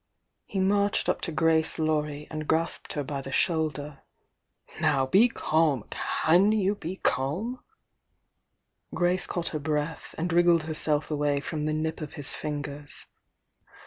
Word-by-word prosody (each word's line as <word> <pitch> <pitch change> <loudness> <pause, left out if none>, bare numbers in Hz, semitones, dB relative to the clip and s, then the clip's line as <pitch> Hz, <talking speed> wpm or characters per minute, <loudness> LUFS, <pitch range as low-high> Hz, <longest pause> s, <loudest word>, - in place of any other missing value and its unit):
He 195 - -3
marched 200 +1 +2
up - - 0
to 170 - -2
Grace 160 +1 +2
Laurie 150 -2 -1
and 155 -1 -4
grasped 165 +1 +1
her 145 - -2
by 140 0 -4
the 135 - -8
shoulder. 150 -2 0 0.8
"Now, 135 -1 +3
be 200 - +5
calm! 155 - +1
Can 180 +6 +3
you 205 -2 +2
be 185 -3 -6
calm?" 190 - -1 1.4
Grace 180 +1 +1
caught 175 -1 -2
her 155 - -3
breath, 150 +1 -3
and 165 +1 -1
wriggled 170 -1 +5
herself 155 -1 -1
away 145 -1 +1
from 150 +1 -3
the 155 - 0
nip 160 +1 -2
of 150 - -6
his 145 -1 0
fingers. 145 -1 -5
155 Hz, 145 wpm, -27 LUFS, 145-175 Hz, 1.4 s, be